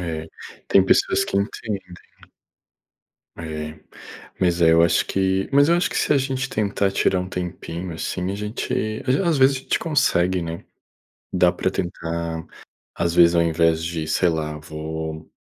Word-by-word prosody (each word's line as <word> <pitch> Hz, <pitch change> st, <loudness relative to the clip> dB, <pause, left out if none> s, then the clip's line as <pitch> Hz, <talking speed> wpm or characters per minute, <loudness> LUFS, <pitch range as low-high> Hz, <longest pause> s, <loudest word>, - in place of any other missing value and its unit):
É, 80 Hz, -2 st, -4 dB, 0.4 s
tem 95 Hz, -, +5 dB
pessoas -, -, +3 dB
que -, -, -3 dB
entendem. 100 Hz, 0 st, -2 dB, 1.5 s
É. 75 Hz, -1 st, -6 dB, 0.6 s
Mas, 90 Hz, -2 st, +2 dB
é, 80 Hz, -, +6 dB
eu 85 Hz, -, +5 dB
acho 85 Hz, -, +3 dB
que 95 Hz, 0 st, 0 dB
mas 140 Hz, +2 st, +5 dB
eu 170 Hz, -, +4 dB
acho 175 Hz, -, 0 dB
que, -, -, -4 dB
se -, -, +2 dB
a -, -, +4 dB
gente 135 Hz, 0 st, -2 dB
tentar 100 Hz, -2 st, 0 dB
tirar 95 Hz, -, +2 dB
um 90 Hz, -, -5 dB
tempinho, 90 Hz, -1 st, -5 dB
assim, 90 Hz, +3 st, -3 dB
a 100 Hz, -, -3 dB
gente 105 Hz, +2 st, -4 dB, 0.3 s
às 125 Hz, -, +3 dB
v -, -, 0 dB
às 165 Hz, -4 st, +2 dB
vezes, 135 Hz, +1 st, +5 dB
a -, -, -10 dB
gente -, -, -1 dB
consegue, 95 Hz, -, +1 dB
né. 85 Hz, 0 st, -6 dB, 0.7 s
Dá 90 Hz, -1 st, +4 dB
pra 95 Hz, +1 st, -1 dB
tentar, 85 Hz, -2 st, -4 dB, 0.5 s
às 85 Hz, 0 st, -1 dB
vezes, 85 Hz, 0 st, +6 dB
ao 85 Hz, -, +4 dB
invés 80 Hz, 0 st, +2 dB
de, 85 Hz, -2 st, -3 dB
sei 85 Hz, +3 st, +2 dB
lá, 75 Hz, -2 st, -2 dB
vou 80 Hz, +1 st, -6 dB
85 Hz, 170 wpm, -22 LUFS, 80-100 Hz, 1.5 s, é